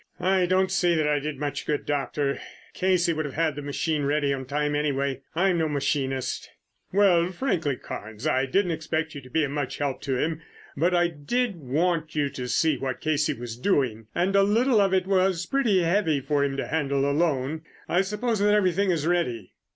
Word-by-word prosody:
"I 185 Hz, -1 st, +2 dB
don't 185 Hz, +1 st, +2 dB
see 180 Hz, -3 st, +2 dB
that 155 Hz, -2 st, +1 dB
I 150 Hz, -1 st, +2 dB
did 150 Hz, 0 st, -4 dB
much 145 Hz, 0 st, -4 dB
good, 150 Hz, -1 st, -1 dB
Doctor. 145 Hz, -1 st, -1 dB, 0.3 s
Casey 180 Hz, -2 st, +2 dB
would 155 Hz, -1 st, -2 dB
have 140 Hz, -, -6 dB
had 160 Hz, -1 st, +1 dB
the 145 Hz, -, -5 dB
machine 145 Hz, +2 st, -1 dB
ready 145 Hz, 0 st, +1 dB
on 130 Hz, -1 st, -4 dB
time 145 Hz, +2 st, -1 dB
anyway, 140 Hz, -2 st, -1 dB
and 175 Hz, -, +1 dB
I'm 185 Hz, -3 st, +3 dB
no 160 Hz, -1 st, +1 dB
machinist." 135 Hz, -2 st, -1 dB, 0.4 s
"Well, 180 Hz, -3 st, +4 dB
frankly, 175 Hz, -, -1 dB
Carnes, 110 Hz, +1 st, -8 dB
I 135 Hz, -3 st, +2 dB
didn't 180 Hz, +6 st, +1 dB
expect 160 Hz, 0 st, -2 dB
you 140 Hz, -, -7 dB
to 130 Hz, -, -14 dB
be 160 Hz, +4 st, +1 dB
of 140 Hz, -, -2 dB
much 145 Hz, -3 st, -3 dB
help 140 Hz, -2 st, -2 dB
to 135 Hz, -2 st, -1 dB
him, 160 Hz, +3 st, -1 dB, 0.3 s
but 175 Hz, +5 st, +2 dB
I 175 Hz, 0 st, +4 dB
did 190 Hz, +8 st, -2 dB
want 155 Hz, +3 st, -1 dB
you 145 Hz, -2 st, +1 dB
to 130 Hz, -2 st, -6 dB
see 150 Hz, +2 st, +1 dB
what 130 Hz, -1 st, -3 dB
Casey 150 Hz, -2 st, +1 dB
was 115 Hz, -1 st, -6 dB
doing, 120 Hz, -, 0 dB
and 185 Hz, +3 st, +1 dB
a 200 Hz, -, +6 dB
little 220 Hz, +3 st, +3 dB
of 195 Hz, -1 st, +2 dB
it 190 Hz, -1 st, +2 dB
was 185 Hz, -2 st, +1 dB
pretty 220 Hz, -7 st, +2 dB
heavy 165 Hz, -4 st, +2 dB
for 145 Hz, +1 st, 0 dB
him 135 Hz, -1 st, -1 dB
to -, -, -2 dB
handle 140 Hz, -3 st, 0 dB
alone. 145 Hz, -1 st, 0 dB, 0.3 s
I 180 Hz, -, +2 dB
suppose 210 Hz, +3 st, -1 dB
that 205 Hz, +1 st, +4 dB
everything 195 Hz, -1 st, +2 dB
is 165 Hz, -4 st, 0 dB
ready?" 125 Hz, -, -1 dB
155 Hz, 205 wpm, -26 LUFS, 140-180 Hz, 0.4 s, a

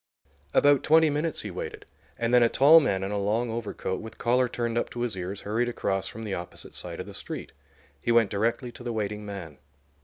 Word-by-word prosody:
About 145 Hz, -, +5 dB
twenty 160 Hz, 0 st, +5 dB
minutes 150 Hz, +2 st, -1 dB
he 105 Hz, -, -6 dB
waited, 90 Hz, -, -6 dB, 0.3 s
and 115 Hz, +1 st, -1 dB
then 125 Hz, -, +7 dB
a 115 Hz, -, +5 dB
tall 150 Hz, +7 st, +7 dB
man 95 Hz, -11 st, 0 dB
in 95 Hz, -, -3 dB
a 105 Hz, -, -1 dB
long 110 Hz, +4 st, 0 dB
overcoat, 110 Hz, -4 st, -3 dB
with 110 Hz, -, -10 dB
collar 125 Hz, +1 st, +2 dB
turned 115 Hz, -1 st, -2 dB
up 120 Hz, -, 0 dB
to 120 Hz, -, -6 dB
his 120 Hz, -4 st, -1 dB
ears, 95 Hz, +2 st, -5 dB
hurried 115 Hz, +4 st, 0 dB
across 95 Hz, -5 st, -1 dB
from 110 Hz, -, -7 dB
the 105 Hz, -3 st, -3 dB
opposite 90 Hz, -1 st, -7 dB
side -, -, -6 dB
of -, -, -4 dB
the -, -, -10 dB
street. -, -, -6 dB, 0.5 s
He 120 Hz, -, 0 dB
went 115 Hz, -3 st, +4 dB
directly 115 Hz, +4 st, 0 dB
to 120 Hz, -, -12 dB
the 120 Hz, -1 st, -3 dB
waiting 105 Hz, -1 st, -3 dB
man. 85 Hz, -8 st, -7 dB
115 Hz, 220 wpm, -27 LUFS, 100-120 Hz, 0.5 s, then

